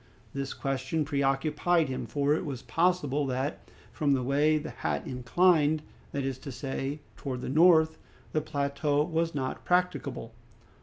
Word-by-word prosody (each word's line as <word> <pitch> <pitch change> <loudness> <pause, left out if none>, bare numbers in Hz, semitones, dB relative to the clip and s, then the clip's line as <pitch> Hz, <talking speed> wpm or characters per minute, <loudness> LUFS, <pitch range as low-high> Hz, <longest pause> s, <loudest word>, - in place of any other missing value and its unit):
This 135 -1 -4
question 135 +3 -1
preoccupied 150 +4 +1
him, 130 -1 -4
for 145 0 +1
it 155 - 0
was 135 -4 -5
possible 155 -5 +1
that 130 +3 -3 0.2
from 145 -4 +1
the 130 -2 +1
way 145 +4 +3
the 150 - -5
hat 75 -2 -2
inclined, 150 +4 +2 0.3
that 140 - -2
is 135 -1 -3
to 140 - -7
say, 135 +3 -4
towards 130 -3 -5
the - - -3
north, 160 +1 +5 0.3
the 155 - +1
plateau 145 0 0
was 165 0 -1
not 130 -2 -3
practicable. 180 -10 0
145 Hz, 150 wpm, -29 LUFS, 135-155 Hz, 0.3 s, north